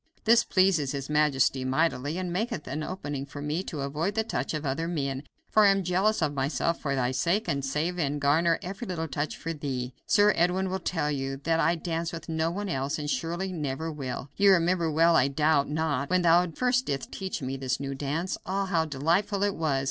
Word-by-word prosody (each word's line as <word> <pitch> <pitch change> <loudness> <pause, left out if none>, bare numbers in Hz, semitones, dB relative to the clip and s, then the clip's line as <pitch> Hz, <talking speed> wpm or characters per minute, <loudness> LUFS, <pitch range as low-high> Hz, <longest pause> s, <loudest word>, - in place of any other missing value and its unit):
This 230 +1 +5
pleases 185 -8 +2
his 140 +1 -4
majesty 140 -3 +2
mightily, 145 +2 0
and 180 -2 -3
maketh 215 - -2
an 145 +3 -4
opening 145 -5 -4
for 140 +1 -9
me 150 +4 -2
to 150 -5 -5
avoid 155 +8 -2
the 220 - +2
touch 140 - -3
of 150 0 -4
other 140 +5 -1
men, 140 -5 -2 0.3
for 215 - +4
I - - +7
am 195 -1 +2
jealous 185 +2 +1
of 145 -1 0
myself 140 +4 -1
for 140 -2 -1
thy 125 -1 0
sake, 170 - 0
and 140 -1 -1
save 155 +6 -1
and 145 -2 0
garner 160 +4 +3
every 195 +6 -6
little 165 -3 -3
touch 145 +1 -3
for 165 - -4
thee.... 130 -4 -4
Sir 205 0 +5
Edwin 180 +2 +1
will 190 - -1
tell 160 -4 -1
you 135 -1 -3
I 165 +1 +2
dance 165 0 -3
with 165 0 -8
no 160 0 0
one 200 +4 -4
else 135 -4 -1
and 145 -1 -3
surely 175 +3 -2
never 155 0 -3
will. 135 -2 -5
You 200 0 +6
remember 170 -1 +2
well, 165 +2 +4
I 130 - +5
doubt 150 0 +2
not, 150 -3 -1
when 180 0 +2
thou 175 +1 +5
first 250 +8 0
didst 135 -2 -3
teach 190 -7 -4
me 130 +1 -3
this 130 -1 -2
new 140 0 -3
dance. 150 +7 -3
Ah! 195 +1 -1
how 170 -4 +1
delightful 170 +8 0
it 205 -1 +1
was! 155 -4 0
160 Hz, 215 wpm, -27 LUFS, 140-180 Hz, 0.3 s, I